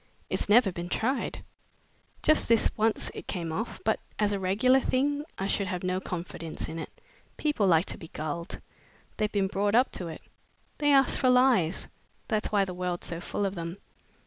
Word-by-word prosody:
"It's -, -, -1 dB
never 215 Hz, -2 st, +6 dB
been 175 Hz, 0 st, -6 dB
tried. 260 Hz, +8 st, -1 dB, 0.8 s
Just 310 Hz, -5 st, +3 dB
this 230 Hz, -1 st, +3 dB
once 220 Hz, 0 st, +1 dB
it -, -, -8 dB
came 170 Hz, -4 st, -3 dB
off, 220 Hz, +9 st, -3 dB
but 220 Hz, -, +2 dB, 0.2 s
as 205 Hz, -1 st, +2 dB
a 200 Hz, -, -1 dB
regular 220 Hz, +8 st, +4 dB
thing 285 Hz, +3 st, 0 dB
I 195 Hz, -, -2 dB
should 200 Hz, 0 st, 0 dB
have 180 Hz, -1 st, -3 dB
no 185 Hz, 0 st, 0 dB
confidence 170 Hz, -3 st, -5 dB
in 165 Hz, +1 st, -5 dB
it. -, -, -5 dB, 0.5 s
People 295 Hz, -10 st, +1 dB
like 165 Hz, 0 st, +4 dB
to -, -, -5 dB
be 165 Hz, -, -9 dB
gulled. 160 Hz, +3 st, -4 dB, 0.6 s
They've 215 Hz, -1 st, 0 dB
been 200 Hz, -2 st, +1 dB
brought 205 Hz, +2 st, +1 dB
up 250 Hz, +2 st, +4 dB
to 180 Hz, -, -4 dB
it. 160 Hz, -, -8 dB, 0.6 s
They 290 Hz, -1 st, +3 dB
ask 270 Hz, -1 st, +5 dB
for 255 Hz, -, +3 dB
lies 250 Hz, -10 st, +3 dB, 0.4 s
that's 215 Hz, -3 st, 0 dB
why 200 Hz, -2 st, +3 dB
the 185 Hz, -, -5 dB
world's 180 Hz, -1 st, -3 dB
so 170 Hz, 0 st, -3 dB
full 205 Hz, -, -2 dB
of 195 Hz, -, -1 dB
them. 170 Hz, 0 st, -5 dB
200 Hz, 190 wpm, -28 LUFS, 175-235 Hz, 0.8 s, never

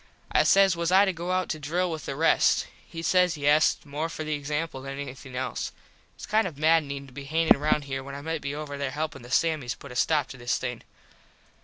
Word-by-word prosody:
I -, -, +5 dB
says 195 Hz, -2 st, +5 dB
was 170 Hz, +1 st, -1 dB
I 195 Hz, +2 st, +7 dB
to 190 Hz, -, 0 dB
go 170 Hz, +1 st, -5 dB
out 185 Hz, 0 st, +1 dB
to 155 Hz, -, -3 dB
drill 170 Hz, +5 st, -1 dB
with 160 Hz, -2 st, -6 dB
the 135 Hz, -, -3 dB
rest. 165 Hz, +3 st, +3 dB, 0.2 s
He 165 Hz, -1 st, -7 dB
said 180 Hz, -2 st, +3 dB
yes 145 Hz, +2 st, +4 dB
more 150 Hz, +3 st, -3 dB
for 160 Hz, -, -5 dB
the 155 Hz, 0 st, -2 dB
example 150 Hz, 0 st, -3 dB
than 135 Hz, 0 st, -6 dB
anything 135 Hz, -2 st, -8 dB
else. 130 Hz, +1 st, -3 dB, 0.4 s
Its -, -, -9 dB
kind 215 Hz, -2 st, +2 dB
of 160 Hz, -6 st, -8 dB
maddening 150 Hz, -3 st, +2 dB
to 135 Hz, -, -16 dB
be 140 Hz, +1 st, -8 dB
hangin 160 Hz, 0 st, +4 dB
round 150 Hz, 0 st, +1 dB
here 135 Hz, -1 st, -4 dB
when 140 Hz, +1 st, -8 dB
I 140 Hz, -, -6 dB
might 160 Hz, +1 st, -3 dB
be 140 Hz, +1 st, -4 dB
over 145 Hz, -2 st, -6 dB
there 140 Hz, -1 st, -1 dB
helpin 150 Hz, 0 st, -4 dB
the 120 Hz, -, -12 dB
Sammies 155 Hz, -3 st, +1 dB
put 140 Hz, -, -11 dB
a -, -, -9 dB
stop 150 Hz, 0 st, +2 dB
to 135 Hz, -, -9 dB
this 120 Hz, 0 st, -1 dB
thing. 125 Hz, -2 st, -4 dB
150 Hz, 235 wpm, -27 LUFS, 140-165 Hz, 0.4 s, I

